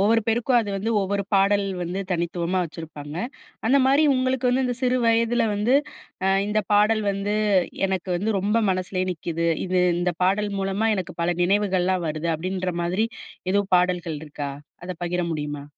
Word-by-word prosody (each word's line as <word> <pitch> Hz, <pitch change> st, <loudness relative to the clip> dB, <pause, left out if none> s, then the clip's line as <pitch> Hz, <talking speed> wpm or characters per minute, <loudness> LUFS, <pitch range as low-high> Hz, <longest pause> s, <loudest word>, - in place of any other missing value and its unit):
ஒவ்வொரு 225 Hz, +3 st, +4 dB
பேருக்கும் 240 Hz, +2 st, +2 dB
அது 220 Hz, -, -1 dB
வந்து 210 Hz, +4 st, -2 dB
ஒவ்வொரு 200 Hz, +1 st, -1 dB
பாடல் 200 Hz, +1 st, +3 dB, 0.2 s
வந்து 175 Hz, +3 st, -3 dB
தனித்துவமா 175 Hz, +1 st, -1 dB
வச்சிருப்பாங்க. 155 Hz, -3 st, -8 dB, 0.5 s
அந்த 260 Hz, +5 st, +4 dB
மாரி 275 Hz, +3 st, +4 dB
உங்களுக்கு 255 Hz, 0 st, +1 dB
வந்து 255 Hz, +2 st, +2 dB
இந்த 250 Hz, -1 st, -1 dB
சிறு 255 Hz, 0 st, +2 dB
வயதுல 230 Hz, +1 st, +3 dB
வந்து, 210 Hz, +5 st, +2 dB, 0.5 s
"அ -, -, +2 dB, 0.2 s
இந்த 210 Hz, +1 st, +1 dB
பாடல் 215 Hz, +1 st, +4 dB
வந்து 200 Hz, +1 st, -2 dB, 0.5 s
எனக்கு 190 Hz, -1 st, -3 dB
வந்து 205 Hz, +3 st, 0 dB
ரொம்ப 210 Hz, +4 st, +1 dB
மனசுலே 185 Hz, 0 st, -1 dB
நிக்குது. 170 Hz, 0 st, -3 dB, 0.2 s
இது 185 Hz, 0 st, +1 dB, 0.2 s
இந்த 175 Hz, 0 st, 0 dB
பாடல் 205 Hz, +2 st, +1 dB
மூலமா 195 Hz, +3 st, 0 dB
எனக்கு 185 Hz, -3 st, -5 dB
பல 175 Hz, +1 st, +2 dB
நினைவுகள்லாம் 185 Hz, -1 st, +1 dB
வருது." 155 Hz, +2 st, -3 dB
அப்படீன்ற 185 Hz, +2 st, -3 dB
மாதிரி 185 Hz, +6 st, 0 dB, 0.4 s
எதுவும் 200 Hz, 0 st, 0 dB
பாடல்கள் 180 Hz, -3 st, 0 dB
இருக்கா? 145 Hz, -2 st, -5 dB, 0.3 s
அத 185 Hz, -, -4 dB
பகிர 175 Hz, +1 st, -1 dB
முடியுமா? 145 Hz, -2 st, -4 dB
190 Hz, 160 wpm, -24 LUFS, 175-215 Hz, 0.5 s, ஒவ்வொரு